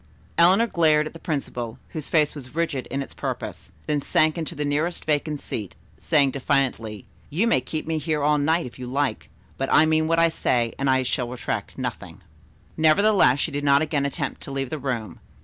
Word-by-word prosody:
Eleanor 185 +7 +5
glared 155 -7 +3
at 155 - -7
the 165 - -10
principal, 125 -8 -4
whose 155 -3 -6
face 155 -3 +3
was 140 -1 -10
rigid 160 -6 -1
in 140 0 -2
its - - -12
purpose, - - -5
then 150 -1 0
sank 155 +2 +3
into 165 0 -4
the 150 0 -2
nearest 150 +5 -1
vacant 150 -1 0
seat, 105 -7 -5 0.2
saying 145 -4 +3
defiantly: 130 -7 -1 0.2
"You 180 +10 +1
may 230 - +3
keep 155 - -4
me 160 -1 -1
here 155 -2 -1
all 150 0 +3
night 160 +4 +1
if 125 - -10
you 125 - -6
like, 140 +2 -2 0.3
but, 135 - -1
I 155 - +6
meant 155 0 +2
what 165 +1 +2
I 165 0 +5
said, 120 -7 0
and 135 0 +1
I 130 0 +3
shall 125 -1 -1
retract 125 0 -4
nothing." - - -6 0.5
Nevertheless 160 -3 +4
she 160 - -1
did 145 0 -3
not 140 +1 +4
again 145 -2 0
attempt 140 - -4
to - - -7
leave 135 -2 -3
the 155 - -3
room. 120 -9 -4
145 Hz, 200 wpm, -24 LUFS, 135-160 Hz, 0.5 s, I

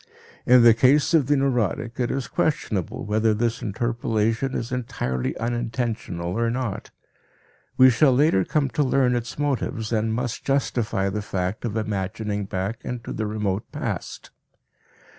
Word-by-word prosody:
In 125 -1 +7
the 115 -1 +8
case 140 +7 +3
of 150 -6 +4
the 145 0 +3
neurotic 120 -3 -1
it 120 0 0
is 135 -3 -2
questionable 115 - -1
whether 110 +1 +2
this 115 +1 -1
interpolation 115 +3 -1
is 120 +2 -3
entirely 90 - -2
unintentional 115 -7 -3
or 115 0 +1
not; 120 -4 -3 0.9
we 130 0 +8
shall 135 +4 +4
later 130 - +3
come 145 - 0
to 150 - 0
learn 130 -2 +2
its 120 0 -4
motives 125 -6 -2
and 110 0 +1
must 120 +1 -3
justify 115 -7 0
the 105 +2 -3
fact 95 +2 -3
of 115 -1 -2
"imagining 105 0 -2
back" 100 +4 -3
into 120 -2 -5
the 110 - -2
remote 105 -2 -2
past. - - -5
115 Hz, 145 wpm, -24 LUFS, 105-125 Hz, 0.9 s, the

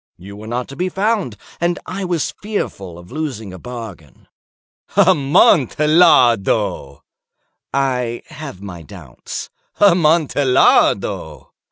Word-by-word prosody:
You 100 +3 -11
were 105 +1 -10
not 120 +2 -3
to 140 - -9
be 180 +4 -2
found, 195 - -1 0.2
and 175 +1 0
I 190 +1 -5
was 175 -4 -2
fearful 100 - -5
of 90 +1 -14
losing 130 -10 -5
a 95 - -10
bargain." 110 - -10 0.7
"Amontillado!" 140 - +3 0.7
"I 125 -3 -1
have 135 -10 -9
my 90 -4 -8
doubts." 80 -7 -9 0.3
"Amontillado!" 160 -8 +2
130 Hz, 100 wpm, -18 LUFS, 100-170 Hz, 0.7 s, Amontillado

